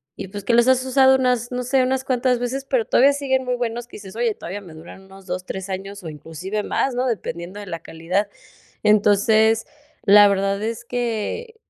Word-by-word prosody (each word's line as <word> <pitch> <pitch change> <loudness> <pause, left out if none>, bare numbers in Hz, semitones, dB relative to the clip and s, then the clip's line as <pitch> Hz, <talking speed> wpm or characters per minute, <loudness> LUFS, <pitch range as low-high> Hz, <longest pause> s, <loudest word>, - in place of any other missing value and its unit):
y, - - -7
pues, 205 +1 -8
que 235 - 0
los 235 +1 +5
has 260 0 +4
usado 265 0 +5
unas, 250 -2 +1
no 250 0 -2
sé, 260 +2 +2
unas 260 +1 0
cuantas 250 -1 +1
veces, 260 +3 -3
pero 255 -4 +1
todavía 275 +3 +4
siguen 265 -2 -1
muy 250 0 0
buenos, 240 0 -3
que - - -14
dices: 195 -1 -11
“Oye, 235 -2 0
todavía 190 +4 -6
me 175 -5 -13
duran 165 +4 -12
unos 195 0 -15
2 180 0 -4
3 190 +1 -6
años 195 +1 -6
o 165 - -6
inclusive 165 +7 -5
más, 270 - -1
¿no?”. 250 +1 0
Dependiendo 185 -4 -4
de 205 - -10
la 165 -2 -5
calidad. 170 +6 -2 0.6
Entonces, 215 +2 +4 0.4
la 205 +1 +8
verdad 195 +1 0
es 230 +1 -4
que 245 - -3
220 Hz, 205 wpm, -22 LUFS, 195-250 Hz, 0.6 s, la